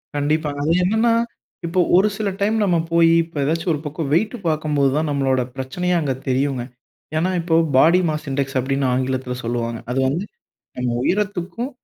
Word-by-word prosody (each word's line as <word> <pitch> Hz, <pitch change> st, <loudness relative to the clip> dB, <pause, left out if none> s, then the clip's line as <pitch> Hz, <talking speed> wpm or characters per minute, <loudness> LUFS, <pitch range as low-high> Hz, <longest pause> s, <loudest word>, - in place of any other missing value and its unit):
கண்டிப்பாங்க, 145 Hz, 0 st, -1 dB
அது 160 Hz, -, +3 dB
என்னனனா? 220 Hz, +5 st, +2 dB, 0.5 s
இப்போ 170 Hz, +2 st, -1 dB, 0.2 s
ஒரு 190 Hz, +3 st, +5 dB
சில 215 Hz, -2 st, -1 dB
டைம் 215 Hz, +2 st, +2 dB
நம்ம 180 Hz, -4 st, +2 dB
போயி 165 Hz, 0 st, +5 dB
இப்ப 165 Hz, -1 st, -12 dB
ஏதாச்சு 160 Hz, +4 st, -1 dB
ஒரு 150 Hz, -, -2 dB
பக்கம் 150 Hz, 0 st, -4 dB
வெய்ட் 215 Hz, +9 st, +1 dB
பாக்கும்போது 150 Hz, -3 st, +1 dB
தான், 155 Hz, 0 st, 0 dB
நம்மளோட 135 Hz, -2 st, +1 dB
பிரச்சனையே 175 Hz, +8 st, -2 dB
அங்க 140 Hz, -3 st, 0 dB
தெரியுங்க. 130 Hz, -1 st, 0 dB, 0.5 s
ஏன்னா? 170 Hz, +4 st, +1 dB
இப்போ 165 Hz, -1 st, 0 dB, 0.2 s
பாடி 165 Hz, +6 st, +6 dB
மாஸ் 155 Hz, 0 st, -3 dB
இண்டெக்ஸ் 135 Hz, 0 st, -1 dB
அப்டினு 135 Hz, +2 st, -1 dB
ஆங்கிலத்துல 130 Hz, 0 st, -1 dB
சொல்லுவாங்க. 115 Hz, 0 st, -2 dB
அது 130 Hz, -, 0 dB
வந்து 155 Hz, +8 st, -1 dB, 0.5 s
நம்ம 125 Hz, 0 st, -1 dB
உயரத்துக்கும் 205 Hz, -, -1 dB
155 Hz, 160 wpm, -21 LUFS, 135-175 Hz, 0.5 s, பாடி